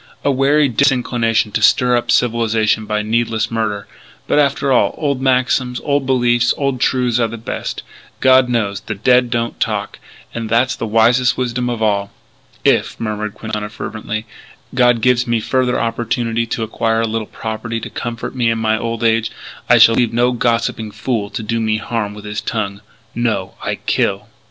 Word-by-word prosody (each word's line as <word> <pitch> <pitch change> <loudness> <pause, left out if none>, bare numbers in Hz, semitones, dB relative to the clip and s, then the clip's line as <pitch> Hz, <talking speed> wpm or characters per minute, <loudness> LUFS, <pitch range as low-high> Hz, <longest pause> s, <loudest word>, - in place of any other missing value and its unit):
A 140 - +2
wary 140 +2 +3
disinclination 120 -3 +1
to - - -1
stir 125 -1 +4
up 120 - -1
civilization 110 -2 +1
by 105 0 -1
needless 115 +1 0
murder. 105 -3 -2 0.4
But - - +2
after 140 -1 +1
all, 125 - +3
old 140 -4 -1
maxims, 125 -1 +1
old 140 -2 0
beliefs, 120 -2 +2
old 140 -3 -1
truths 125 -3 +1
are 115 - +2
the 115 +1 -7
best, 110 - -5 0.4
God 130 -1 +5
knows. 105 -5 0
The 105 +1 -6
dead 125 +4 +3
don't 115 -1 -2
talk! - - -2 0.3
And 115 -1 -4
that's 120 +2 +2
the 115 - -4
wisest 115 +3 +3
wisdom 125 -1 -1
of 115 -2 -2
all. 100 -2 +1 0.6
"If," - - +2
murmured 105 -2 -3
Quintana 105 -1 -5
fervently, 110 0 -5 0.5
"God 125 -2 +3
gives 125 0 +2
me 115 -1 +1
further 125 +2 0
opportunity 115 0 -1
to 115 0 -2
acquire 115 +1 0
a 115 - 0
little 110 -1 -3
property 115 +1 -5
to - - -6
comfort 115 -1 -5
me 120 -2 +1
in 115 - 0
my 110 0 +1
old 115 0 -3
age, 115 0 +2 0.4
I - - +7
shall 115 - +7
leave 120 -1 +2
no 120 +1 +3
gossiping 115 -3 -1
fool 110 -2 -2
to 110 - -5
do 115 +2 -1
me 110 -1 0
harm 110 -2 -3
with 105 0 -10
his 105 0 -4
tongue. 100 -3 -3 0.3
No! 110 -5 -1
I - - -2
kill. - - -1
115 Hz, 175 wpm, -17 LUFS, 110-125 Hz, 0.6 s, I